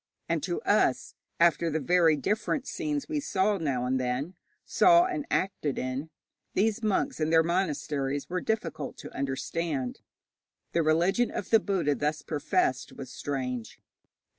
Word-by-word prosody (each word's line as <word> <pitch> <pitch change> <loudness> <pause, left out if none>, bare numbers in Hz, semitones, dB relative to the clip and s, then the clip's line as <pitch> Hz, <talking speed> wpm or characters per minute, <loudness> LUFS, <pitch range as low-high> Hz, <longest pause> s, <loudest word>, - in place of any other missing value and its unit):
And - - 0
to 350 - -2
us, - - +2 0.3
after 170 0 +4
the 160 0 -1
very 165 +2 +4
different 215 - -1
scenes 300 -4 -3
we 310 -2 -1
saw 200 -6 +1
now 135 -6 -1
and 130 +1 +1
then, 130 +7 -2 0.3
saw 345 0 +5
and 330 -6 -3
acted 170 -7 -1
in, 130 +4 -3 0.5
these 220 +3 +2
monks 215 -6 0
and 155 0 0
their 165 0 +6
monasteries 150 -5 -1
were 180 0 -2
difficult 215 -8 -3
to - - -10
understand. 140 0 -2 0.7
The 170 - +2
religion 175 +9 +2
of - - -5
the 225 - +7
Buddha 190 -8 0
thus 150 +2 -2
professed 150 -3 0
was 130 -2 -8
strange. 125 -4 -4
165 Hz, 145 wpm, -28 LUFS, 140-205 Hz, 0.7 s, the